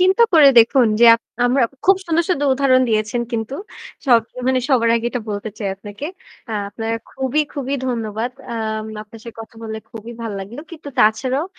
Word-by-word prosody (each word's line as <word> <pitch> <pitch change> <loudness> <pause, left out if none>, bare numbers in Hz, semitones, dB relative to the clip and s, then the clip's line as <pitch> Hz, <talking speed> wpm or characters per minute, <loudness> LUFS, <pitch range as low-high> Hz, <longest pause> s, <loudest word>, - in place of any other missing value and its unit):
চিন্তা 375 +5 +4
করে 305 -4 +8
দেখুন 240 +2 +5
যে - - +8
আপ 230 - -4 0.3
আমরা 255 +2 +2 0.2
খুব 385 0 +6
সুন্দর, 335 0 +1
সুন্দর 290 -6 +1
উদাহরণ 260 -1 +3
দিয়েছেন 215 +2 0
কিন্তু। 225 +3 -3 0.5
সব 240 -3 +6 0.2
অ - - -3
মানে 260 -1 +2
সবার 230 -4 +3
আগে 230 +1 -2
এটা 245 - -3
বলতে 205 +1 -4
চাই 200 -3 -2
আপনাকে। 205 +6 -9 0.5
আ - - -3 0.2
আপনার 225 +2 -4 0.2
খুবই, 265 +3 -1
খুবই 275 -1 -3
ধন্যবাদ। 225 -1 -2 0.2
অ্যা 235 - -5 0.5
আপনার 215 +1 -14
সে 235 - -7
কথা 225 0 -11
বলে 220 -1 -5
খুবই 230 0 -9
ভাল 225 -2 -4
লাগলো। 210 +8 -8
কিন্তু 315 -3 -9
তাছাড়াও 255 +6 +2
240 Hz, 185 wpm, -19 LUFS, 225-275 Hz, 0.5 s, করে